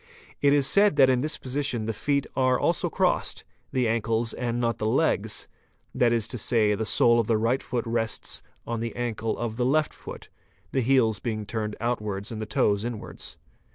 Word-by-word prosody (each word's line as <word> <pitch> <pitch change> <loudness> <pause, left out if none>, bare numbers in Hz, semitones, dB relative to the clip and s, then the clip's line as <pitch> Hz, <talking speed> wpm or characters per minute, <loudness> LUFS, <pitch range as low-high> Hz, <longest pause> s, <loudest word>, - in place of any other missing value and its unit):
It 140 - +4
is 145 -1 +4
said 200 +4 +4
that 135 -2 +6
in 125 -1 +1
this 155 +2 -1
position 130 -4 -2
the 115 - -2
feet 140 +6 0
are 130 -1 +2
also - - +1
crossed, - - 0 0.3
the 125 -2 +1
ankles 115 0 0
and 120 -1 -2
not 115 -1 0
the 110 - -1
legs, 110 -5 0 0.5
that 120 -1 +3
is 115 -2 +1
to 125 - -4
say, 110 -1 +2
the 110 +1 -2
sole 120 +2 +4
of 115 - 0
the 115 - +2
right 115 +4 +1
foot 120 -2 -3
rests 115 -1 -2 0.2
on 115 -1 -3
the 115 0 -4
ankle 115 -2 -2
of 115 -2 -4
the 125 - +1
left 150 +4 +2
foot, - - -10 0.4
the 135 - +1
heels 120 -4 +3
being 110 -3 -3
turned 105 0 -3
outwards 105 -3 -2
and 110 -1 -5
the 110 - -4
toes 105 -1 +1
inwards. 120 -2 -6
115 Hz, 195 wpm, -26 LUFS, 110-130 Hz, 0.5 s, that